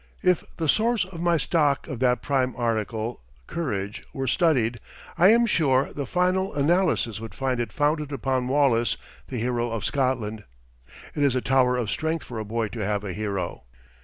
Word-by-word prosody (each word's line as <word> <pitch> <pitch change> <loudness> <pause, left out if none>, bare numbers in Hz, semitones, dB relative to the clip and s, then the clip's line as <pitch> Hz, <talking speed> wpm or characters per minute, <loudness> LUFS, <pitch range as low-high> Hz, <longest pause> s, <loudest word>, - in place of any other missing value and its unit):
If 180 -2 +3
the 160 - -1
source 225 +4 +2
of 175 -3 -9
my 170 -1 +3
stock 145 -1 +1
of 130 - -5
that 125 -1 +2
prime 130 -3 0
article 115 -1 -2 0.2
courage 105 - -3
were 135 - -3
studied, 125 -5 +2 0.4
I 180 - +6
am 235 +2 +5
sure 140 - +2
the 140 -3 -4
final 185 0 +1
analysis 145 - +2
would 115 0 -8
find 130 -2 -1
it 115 -4 -2
founded 150 +2 0
upon 130 -2 -1
Wallace, 130 -4 +2 0.3
the 130 - -5
hero 120 0 -1
of 115 -2 -3
Scotland. 120 -6 -1 0.7
It 150 - -3
is 140 -3 +3
a - - +2
tower 125 -1 +3
of 115 -4 -1
strength 160 0 -2
for 120 -3 -6
a - - -2
boy 110 0 -2
to 115 - -7
have 105 +1 -1
a 95 -3 -4
hero. 100 -3 -3
130 Hz, 180 wpm, -25 LUFS, 115-155 Hz, 0.7 s, I